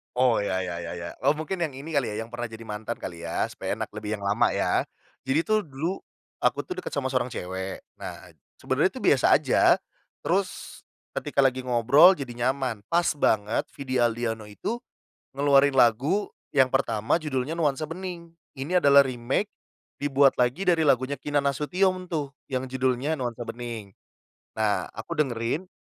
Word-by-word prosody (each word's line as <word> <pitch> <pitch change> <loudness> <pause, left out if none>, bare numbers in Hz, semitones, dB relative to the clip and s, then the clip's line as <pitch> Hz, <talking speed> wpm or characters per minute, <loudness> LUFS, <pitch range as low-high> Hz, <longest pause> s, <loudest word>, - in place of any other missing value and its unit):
Oh 125 -2 +4
ya 95 -2 0
ya 90 -2 -4
ya 85 0 -5
ya 85 -1 -6 0.2
oh - - +6
mungkin 155 +5 -4
yang 145 - -7
ini 140 +5 -8
kali 140 -5 +1
ya 110 - -3
yang 115 - -8
pernah 120 0 -4
jadi 110 -1 -9
mantan 110 +1 -4
kali 85 -1 -6
ya 85 - -1
supaya - - -4
enak - - -4
lebih 105 0 -3
yang 105 - -5
lama 100 +1 +2
ya, - - +1 0.4
jadi 135 +4 +2
tuh 215 +3 +1
dulu, 155 +6 -3 0.4
aku - - +1
tuh 365 - -7
deket 370 - -6
sama 135 -2 -1
seorang 125 -2 -1
cewek 95 +1 -5 0.2
nah - - -8 0.3
sebenarnya - - +1
tuh - - -7
biasa - - +4
aja, - - +5 0.5
terus, 185 +1 -2 0.4
ketika - - +1
lagi 130 -1 +1
ngobrol 125 +9 +6
jadi 140 -8 -6
nyaman 120 -2 -2
pas 170 +5 +2
banget 105 -5 +1
Vidi 130 -2 -3
Aldiano 115 -2 0
itu, 105 - -4 0.6
ngeluarin 140 -1 +4
lagu 130 - +3 0.2
yang 130 -1 +4
pertama 115 +2 +1
judulnya 140 -1 -2
nuansa 155 -3 0
bening 170 0 -7 0.2
ini 170 +7 +1
adalah 140 -1 +7
remake, 130 - -2 0.5
dibuat 140 -1 +4
lagi 125 +11 +1
dari 175 -2 +3
lagunya 140 -1 +2
Kinan 145 -1 0
Nasution 180 +6 0
tuh 145 -5 -3 0.2
yang 130 -1 -2
judulnya 130 +2 0
nuansa 120 -4 -4
bening, 115 -5 -6 0.6
nah 105 -2 0
aku 115 +9 -7
dengerin, 140 +2 -1
130 Hz, 165 wpm, -26 LUFS, 115-155 Hz, 0.6 s, adalah